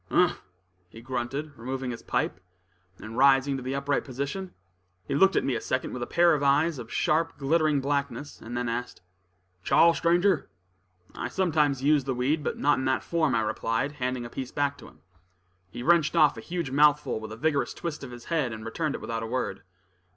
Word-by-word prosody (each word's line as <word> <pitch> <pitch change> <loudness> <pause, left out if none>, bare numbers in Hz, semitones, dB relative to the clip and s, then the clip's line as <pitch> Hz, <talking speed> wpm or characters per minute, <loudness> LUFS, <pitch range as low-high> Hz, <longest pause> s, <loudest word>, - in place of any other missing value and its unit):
"Umph!" - - +2 0.5
he 110 - -12
grunted, 130 +5 -4
removing 130 +2 -4
his 120 - -7
pipe, - - -1 0.6
and 115 +3 -7
rising 135 0 +5
to - - -6
the 130 +2 -3
upright 140 +1 0
position. 140 +8 -5 0.5
He - - -3
looked 195 +7 +4
at - - +2
me 135 - 0
a 115 - -2
second 130 - -2
with 125 - -5
a 120 - -3
pair 170 0 +4
of 150 - 0
eyes 145 +2 +2
of 115 -1 -9
sharp, 165 +2 +1
glittering 150 0 +2
blackness, 140 +1 -3
and 120 +2 -6
then 125 0 -1
asked: 120 -4 -4 0.6
"Chaw, 170 - +5
stranger?" 175 - +2 0.6
"I - - -4
sometimes 150 -3 +1
use 145 -2 +3
the 135 -2 -1
weed, 145 +5 0
but - - -2
not 145 -2 +2
in 130 - -2
that 130 0 +1
form," 160 -6 +1
I 115 - +2
replied, 115 +4 -1
handing 125 -3 -3
a - - -7
piece 130 -2 -5
to 145 -1 0
him. - - -19 0.7
He 120 - -7
wrenched 165 +1 +3
off 150 - +5
a - - -8
huge 170 -5 -4
mouthful 145 -3 +3
with 110 0 -8
a 110 - -7
vigorous 145 +2 0
twist 160 -4 -5
of 135 - -7
his 120 -1 -11
head, 150 -8 0
and 110 0 -7
returned 150 +6 -2
it - - -7
without 115 -1 -3
a 115 - -4
word. 115 -5 -3
140 Hz, 200 wpm, -27 LUFS, 125-150 Hz, 0.7 s, rising